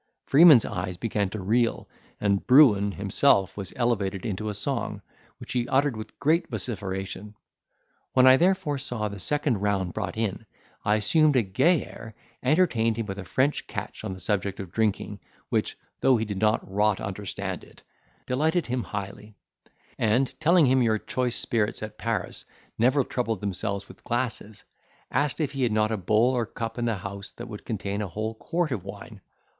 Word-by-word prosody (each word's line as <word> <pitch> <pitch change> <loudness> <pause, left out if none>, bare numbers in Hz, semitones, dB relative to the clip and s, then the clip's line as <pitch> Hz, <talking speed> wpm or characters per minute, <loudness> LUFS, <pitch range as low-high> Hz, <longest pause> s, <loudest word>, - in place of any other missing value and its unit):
Freeman's 145 -4 +7
eyes 90 0 -4
began 105 -3 -1
to 110 - -6
reel, 115 +5 0 0.3
and 100 -1 0
Bruin 110 -8 +6
himself 100 +1 +2
was 100 -3 -6
elevated 100 -6 -1
into 110 0 -3
a - - -3
song, - - -2 0.3
which - - -7
he 120 -1 0
uttered 135 -1 +2
with 110 0 -9
great 165 +4 +2
vociferation. 100 -2 -4 0.8
When 130 0 +5
I 130 0 +9
therefore 175 -4 +1
saw 120 -5 -2
the 100 0 -8
second 145 - 0
round 100 -3 -1
brought 100 -3 -4
in, 110 0 -2 0.4
I 105 +1 +3
assumed 150 +8 +3
a 125 - +4
gay 135 - +2
air, 110 -2 -11 0.3
entertained 125 -7 +2
him 115 - -2
with 95 -1 -6
a - - -5
French 130 +10 0
catch - - -6
on 95 - -4
the 95 - -9
subject 100 0 -1
of 95 -4 -7
drinking, 110 -1 -1 0.3
which, - - -1 0.2
though 130 -2 +4
he 110 - -1
did 100 -2 -5 0.2
rot 105 +1 +1
understand 100 -1 -5
it, - - -18 0.4
delighted 160 +6 +1
him 125 +1 -2
highly; 100 0 -7 0.6
and, 120 +4 +2
telling 170 +1 +5
him 130 0 +3
your 110 -2 +2
choice 125 +2 -2
spirits 110 -2 -1
at 110 0 -8
Paris 115 -1 -3 0.3
never 130 +4 +3
troubled 115 -5 -2
themselves 100 0 -3
with - - -15
glasses, 115 -3 -3 0.5
asked 140 +2 0
if 150 -4 0
he 135 - -4
had 120 -3 +2
not 110 0 +1
a - - +1
bowl 110 +6 +3
or 120 -3 -1
cup 115 +1 -5
in 120 - 0
the 115 -2 0
house 100 0 -7
that 120 - -8
would 105 -3 -9
contain 100 -2 -3
a 105 - -2
whole 110 +5 -4
quart 165 +7 -2
of 105 -8 -3
wine. 100 +2 -10
110 Hz, 175 wpm, -26 LUFS, 100-130 Hz, 0.8 s, I